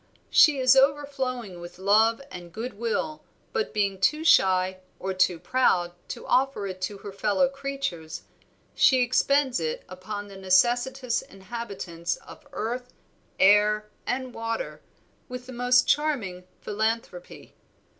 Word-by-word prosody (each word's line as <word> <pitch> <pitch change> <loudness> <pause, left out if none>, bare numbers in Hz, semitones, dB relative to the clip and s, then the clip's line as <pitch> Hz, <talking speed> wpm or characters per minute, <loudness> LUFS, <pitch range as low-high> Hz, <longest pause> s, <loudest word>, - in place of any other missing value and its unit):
"She 300 -2 +6
is 260 0 +5
overflowing 265 -7 0
with 175 0 -10
love 220 +6 +3
and 175 -1 -9
good 230 +7 -5
will, 235 +8 -3 0.3
but 455 -2 -1
being 200 -3 0
too 305 +10 +2
shy 185 - +4 0.2
or 190 0 -3
too 185 -2 +2
proud 180 -4 +1 0.2
to - - -7
offer 265 -5 +1
it 185 -1 -6
to 200 +2 -3
her 200 - -5
fellow 205 +6 +1
creatures, 275 - -5 0.5
she 260 -2 +4
expends 260 +1 +2
it 160 -1 -3
upon 205 +3 -7
the 195 -1 -11
necessitous 240 +6 +2
inhabitants 195 -4 -5
of 305 - -15
earth, 250 -1 -4 0.5
air, 210 +1 +4 0.2
and 255 0 -2
water 230 - -4 0.5
with 250 0 -7
the 255 - -9
most 245 +1 +3
charming 220 -13 0
philanthropy. 215 -4 -3
225 Hz, 130 wpm, -26 LUFS, 190-260 Hz, 0.5 s, She